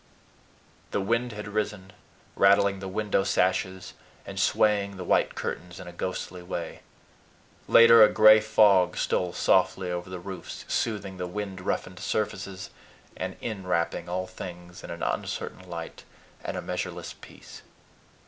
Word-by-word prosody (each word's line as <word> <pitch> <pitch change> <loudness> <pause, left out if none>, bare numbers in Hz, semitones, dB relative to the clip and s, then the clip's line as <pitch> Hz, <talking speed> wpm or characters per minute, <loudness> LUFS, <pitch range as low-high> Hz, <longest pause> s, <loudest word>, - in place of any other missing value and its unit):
The - - -1
wind 115 +5 0
had 105 0 -7
risen, 105 -2 -3 0.4
rattling 100 0 +4
the 95 - -6
window 100 0 0
sashes 95 0 0 0.3
and - - -6
swaying 100 -2 +2
the 90 - -5
white - - +1
curtains 90 0 -5
in - - -9
a 90 - -8
ghostly 90 0 -5
way. 90 -1 -5 0.9
Later, 115 0 +8
a 105 - +7
gray 110 0 +8
fog 105 -4 +4
stole 90 -1 0
softly 90 +1 +2
over 90 +1 -4
the 90 - -5
roofs, 90 0 -8
soothing 100 -4 -2
the 90 0 -4
wind 95 0 -5
roughened 90 0 -3
surfaces, 100 -3 -3 0.4
and - - -4
in 100 -5 -5
wrapping 85 +1 -1
all 90 +1 -2
things 90 -1 -10
in - - -9
an 85 0 -6
uncertain 95 0 -4
light 85 -1 -7 0.4
and - - -4
a - - -4
measureless - - -4
peace. - - -13
95 Hz, 145 wpm, -27 LUFS, 90-105 Hz, 0.9 s, Later